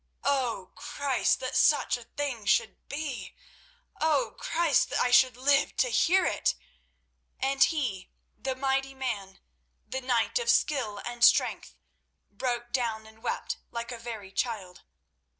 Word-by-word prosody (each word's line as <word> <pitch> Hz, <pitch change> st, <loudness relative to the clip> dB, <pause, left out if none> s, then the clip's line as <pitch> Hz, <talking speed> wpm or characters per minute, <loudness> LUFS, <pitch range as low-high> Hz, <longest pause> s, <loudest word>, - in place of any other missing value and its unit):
O, 250 Hz, -9 st, 0 dB
Christ, 280 Hz, -3 st, 0 dB
that 255 Hz, -, -4 dB
such 295 Hz, -, +4 dB
a 245 Hz, -2 st, -9 dB
thing 250 Hz, -6 st, -4 dB
should 220 Hz, -1 st, +2 dB
be! 285 Hz, -3 st, -5 dB, 0.6 s
O, 320 Hz, +10 st, +2 dB
Christ, 330 Hz, -3 st, +2 dB
that -, -, -1 dB
I 250 Hz, -, +2 dB
should 255 Hz, 0 st, +5 dB
live 275 Hz, +2 st, +2 dB
to -, -, +2 dB
hear 375 Hz, -4 st, +3 dB
it!" -, -, +1 dB, 0.8 s
And 270 Hz, +1 st, +3 dB
he, 245 Hz, -, -1 dB, 0.3 s
the 260 Hz, +4 st, -3 dB
mighty 270 Hz, 0 st, -1 dB
man, 205 Hz, -8 st, -4 dB, 0.5 s
the 260 Hz, +4 st, -4 dB
knight 250 Hz, -, +1 dB
of 475 Hz, -, -2 dB
skill 245 Hz, -9 st, +2 dB
and 240 Hz, 0 st, -4 dB
strength, -, -, +4 dB, 0.6 s
broke 240 Hz, -2 st, -3 dB
down 230 Hz, -4 st, -1 dB
and 220 Hz, 0 st, -17 dB
wept -, -, -3 dB
like 235 Hz, +1 st, -5 dB
a 240 Hz, -, -6 dB
very 225 Hz, -4 st, -7 dB
child. 195 Hz, -5 st, -3 dB
250 Hz, 140 wpm, -28 LUFS, 225-275 Hz, 0.8 s, should